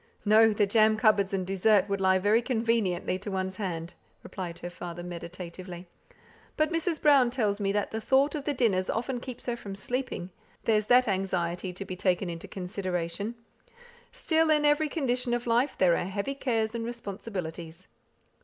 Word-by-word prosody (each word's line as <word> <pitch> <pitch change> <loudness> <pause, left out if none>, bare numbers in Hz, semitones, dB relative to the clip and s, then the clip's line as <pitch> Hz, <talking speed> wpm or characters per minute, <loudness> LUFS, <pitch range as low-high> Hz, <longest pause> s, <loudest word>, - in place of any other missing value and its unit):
"No! 220 +1 +6
the 205 0 +2
jam 215 +1 +4
cupboards 210 -3 +3
and 190 -2 -1
dessert 195 +1 +3
would 200 -1 -2
lie 190 0 +4
very 205 +5 +3
conveniently 225 -7 0
to 205 - -6
one's 190 -1 -3
hand," 170 -4 -4 0.3
replied 175 -3 -6
her 175 - -5
father, 175 -1 -7
meditatively. 175 +1 -8 0.7
"But 310 +1 +2
Mrs. 330 -1 -1
Brown 275 -5 +5
tells 215 -5 0
me 195 -1 0
that 205 0 -1
the 220 - -3
thought 270 +5 +3
of 290 -3 -4
the 295 - 0
dinners 200 -7 +1
often 245 +2 -2
keeps 250 -1 -8
her 240 - -1
from 200 -4 -8
sleeping; 205 -4 -3 0.3
there's 215 -2 +2
that 250 +1 +5
anxiety 185 -2 -1
to 195 +2 -7
be 185 - -5
taken 180 -1 0
into 165 -1 -7
consideration. 185 +2 -3 0.8
Still, 320 -1 +1
in 300 -1 +3
every 295 +1 +3
condition 250 -5 0
of 240 - -4
life, 240 +4 +1
there 180 -2 +4
are - - -1
heavy 200 +8 -3
cares 230 -5 -1
and 230 -1 -3
responsibilities." 190 -7 -6
205 Hz, 170 wpm, -28 LUFS, 185-240 Hz, 0.8 s, No